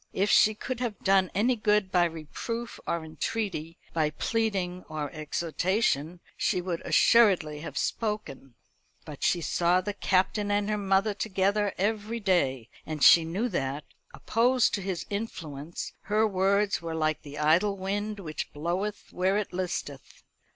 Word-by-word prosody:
If 200 +2 +1
she 215 0 +5
could 255 +3 -5
have 240 -4 -2
done 190 -1 +4
any 240 +6 +3
good 210 -3 +1
by 175 -1 +4
reproof 170 +9 -5
or 170 -1 -1
entreaty, 165 0 -3 0.2
by 155 -2 +1
pleading 190 0 -1
or 150 -2 -4
exhortation, 170 - -1
she - - 0
would 175 -2 -3
assuredly 185 -10 +4
have 165 - -7
spoken; 210 - -3 0.5
but 150 -2 -9
she 175 - +2
saw 175 +3 +2
the 205 +3 -3
Captain 200 +1 +1
and 205 +1 +1
her 210 - 0
mother 195 +1 +2
together 200 0 0
every 215 +3 -1
day, 140 - +1 0.2
and 155 -2 -4
she 170 - +8
knew 185 +9 -1
that, 145 - -2 0.3
opposed 245 +2 +2
to 200 - -1
his 185 -2 -3
influence, 170 -7 -5
her 215 +2 +2
words 200 +1 +1
were 165 -1 -4
like 155 -1 0
the 145 0 -10
idle 170 +7 +3
wind 205 +2 -3
which 155 -5 -5
bloweth 180 +7 -3
where 190 +2 +1
it 210 -3 -3
listeth. 180 -7 -5
190 Hz, 150 wpm, -28 LUFS, 160-210 Hz, 0.5 s, she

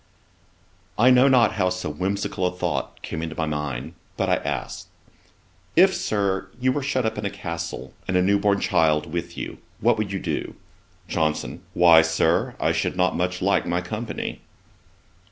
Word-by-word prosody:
I 125 +4 +6
know 125 +2 +6
not 125 -4 +5
how 90 -3 +1
so 90 -2 -3
whimsical 95 +3 -1
a - - -1
thought 90 - -3
came 80 - -4
into 80 -1 -5
my 80 - -1
mind, 75 -5 -4 0.2
but - - 0
I - - +3
asked, - - -4 0.9
'If, 190 +3 +6
Sir, 95 -2 -1
you 130 +1 +2
were 145 - -1
shut 130 -3 0
up 110 -1 -1
in 105 - -4
a - - -2
castle, 85 -2 -6
and 95 - +1
a 90 - +3
newborn 100 +1 +2
child 75 -1 +1
with 85 0 -4
you, - - -6 0.2
what 115 0 +2
would 105 -2 -2
you 100 - -1
do?' - - -3 0.5
JOHNSON. 80 -2 -1
'Why, 85 -2 +7
Sir, 80 0 +1
I - - +2
should - - -1
not 90 0 +1
much 90 +1 -1
like 100 +1 +2
my 85 +1 0
company.' 110 +4 -5
90 Hz, 170 wpm, -24 LUFS, 85-110 Hz, 0.9 s, Why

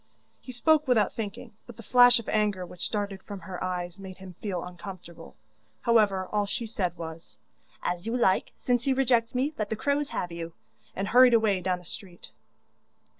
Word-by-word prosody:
He 255 - -9
spoke 305 +5 +3
without 225 -5 +3
thinking, 225 +2 -6
but 240 -2 -11
the 230 - -10
flash 245 +2 +7
of 230 - -6
anger 210 -4 +1
which 180 0 -6
darted 200 -2 -3
from 200 -1 -8
her 185 -1 -6
eyes 180 0 -3
made 190 -1 -9
him 190 -1 -10
feel 190 -5 -3
uncomfortable. 175 -2 -10 0.5
However, 205 -5 +3
all 205 -1 +1
she 230 +3 -3
said 185 -6 -2
was: 160 0 -8 0.5
'As 180 +4 -2
you 235 +2 0
like; 190 -6 +2
since 245 +1 0
you 265 - +3
reject 245 -3 +2
me, 275 +5 +1
let 210 -1 -1
the 220 - -1
crows 285 +5 0
have 175 - -3
you,' 170 0 -6 0.4
and 195 +1 -2
hurried 250 0 +7
away 210 -4 +2
down 180 0 0
the 180 - -15
street. 185 -4 -10
205 Hz, 185 wpm, -28 LUFS, 185-240 Hz, 0.5 s, flash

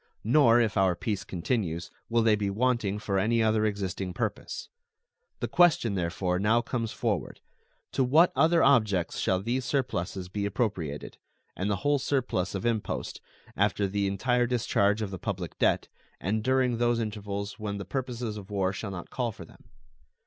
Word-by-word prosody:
Nor, 120 0 +5
if 110 -3 +1
our 95 -2 +3
peace 105 +2 -3
continues, 90 -2 -2 0.2
will 115 0 +3
they 110 -1 +5
be 105 -1 -1
wanting 115 -1 0
for 100 -2 -1
any 115 +3 +2
other 110 0 +2
existing 95 -3 -3
purpose. 110 -3 -3 0.7
The - - 0
question 160 - +4
therefore 90 0 -1
now 110 +4 +3
comes 115 -2 -3
forward, - - -2 0.5
To 135 - +1
what 155 +8 +5
other 165 +1 +4
objects 105 -10 +3
shall 95 - +1
these 125 +4 -1
surpluses 95 -9 -2
be 100 +2 -2
appropriated, 95 - -3 0.4
and 95 +3 -2
the 100 - +2
whole 145 0 +3
surplus 130 -9 -1
of 95 - -3
impost, 115 -3 -2 0.3
after 100 - +1
the 100 +1 0
entire 120 +5 +1
discharge 110 -3 +1
of 100 - -4
the 95 - -6
public 90 -6 -4
debt, - - +2 0.3
and 105 +3 -1
during 130 -2 +2
those 120 -1 +2
intervals 105 -2 -4
when 105 -1 -3
the 100 - -6
purposes 120 0 -3
of 100 -1 -9
war 95 -2 0
shall 100 +1 -5
not 90 -3 -7
call 125 -3 -1
for - - -11
them? - - -19
105 Hz, 170 wpm, -28 LUFS, 95-120 Hz, 0.7 s, Nor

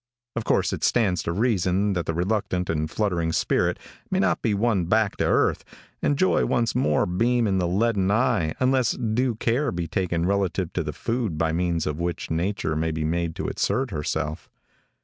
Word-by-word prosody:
Of 115 -2 -3
course - - +1
it - - -5
stands 95 -8 +2
to 85 - -2
reason 100 -1 +1
that 85 -2 -2
the 85 - 0
reluctant 90 -1 -1
and 80 -1 -1
fluttering 85 -4 0
spirit 80 - +1 0.3
may - - 0
not - - +1
be 105 - +1
won 100 -4 +1
back 110 +3 +2
to - - +1
earth, - - +2 0.4
and 145 - +1
joy 185 +4 +3
once 115 -2 +1
more 75 - +2
beam 115 +7 +1
in 95 -2 +1
the 90 - +1
leaden 100 +1 +1
eye 110 -8 +1
unless 130 -1 +2
due 120 +1 0
care 120 +5 0
be 85 -1 -3
taken 85 0 -1
relative 95 -2 0
to - - 0
the - - -3
food 115 -8 -2
by 80 0 +1
means 85 -1 0
of 75 +1 -3
which 85 -1 -3
nature 85 -1 -1
may 80 +1 0
be 80 0 -2
made 85 +1 -1
to - - -3
assert 130 -2 -1
herself. 75 0 -3
95 Hz, 190 wpm, -24 LUFS, 85-115 Hz, 0.4 s, joy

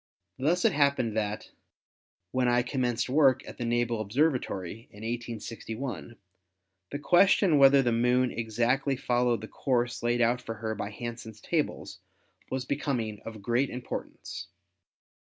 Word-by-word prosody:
Thus 170 +7 +2
it - - +5
hap 140 -1 +3
pened 115 -3 -1
that, 105 -1 -3 0.8
when 130 -1 +1
I 120 0 +3
commenced 125 -2 -1
work 130 -1 +3
at - - -10
the 120 - -2
Naval 120 -1 0
Ob 110 -2 -4
servatory 115 - -1
in 105 +1 -12
1861, 115 +1 -5 0.7
the - - -4
question 175 0 +4
whether 135 0 +7
the 120 - +2
Moon 125 +2 +2
exactly 120 +5 0
followed 120 -3 +1
the 110 - -7
course 120 -1 -1
laid 120 +1 +1
out 120 +1 +2
for 115 -2 -6
her 110 0 -3
by 105 -1 -4
Hansen's 115 -1 -7
tables 160 +4 -2 0.5
was 130 -1 -2
becoming 125 -7 -2
of 110 -3 -8
great 120 +5 +1
importance. 125 0 -6
120 Hz, 145 wpm, -28 LUFS, 115-135 Hz, 0.8 s, whether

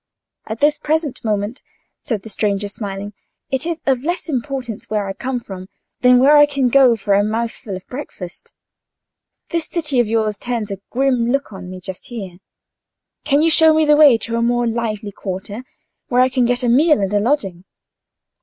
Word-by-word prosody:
"At 220 +1 -6
this 295 +1 +3
present 310 -2 -1
moment," 210 +3 -2 0.4
said 215 -5 -3
the 220 - -9
stranger, 205 -1 -1
smiling, 200 0 -6 0.4
"it 265 +4 0
is 335 -1 -3
of 265 -2 +1
less 345 +2 -3
importance 260 -4 -4
where 210 -2 -1
I 195 - -4
come 255 +4 -3
from 190 -4 -9 0.3
than 250 0 +6
where 280 +4 +6
I 295 0 +7
can 275 -3 0
go 255 -2 +5
to - - -10
for 200 0 0
a 200 +1 +4
mouthful 220 -1 -3
of 185 - -9
breakfast. 225 - -9 1.0
This 335 -3 -2
city 300 -7 0
of 240 - +3
yours 215 -1 0
turns 230 -4 -3
a 195 - -5
grim 250 -2 +1
look 275 -5 -1
on 185 -1 -9
me 185 0 -8
just 185 +4 -8
here: 195 -8 -8 0.9
can 290 +1 +3
you 330 - +3
show 320 0 +5
me 315 0 +3
the 300 0 +5
way 295 -6 +7
to 230 +1 -3
a - - 0
more 240 +1 +1
lively 225 -3 -2
quarter, 200 +4 -6 0.4
where 250 0 +3
I 255 - +4
can 255 -1 +1
get 245 +1 0
a - - +1
meal 295 +5 +4
and 195 0 -1
a 205 - +3
lodging?" 200 -7 -1
235 Hz, 195 wpm, -19 LUFS, 205-275 Hz, 1.0 s, I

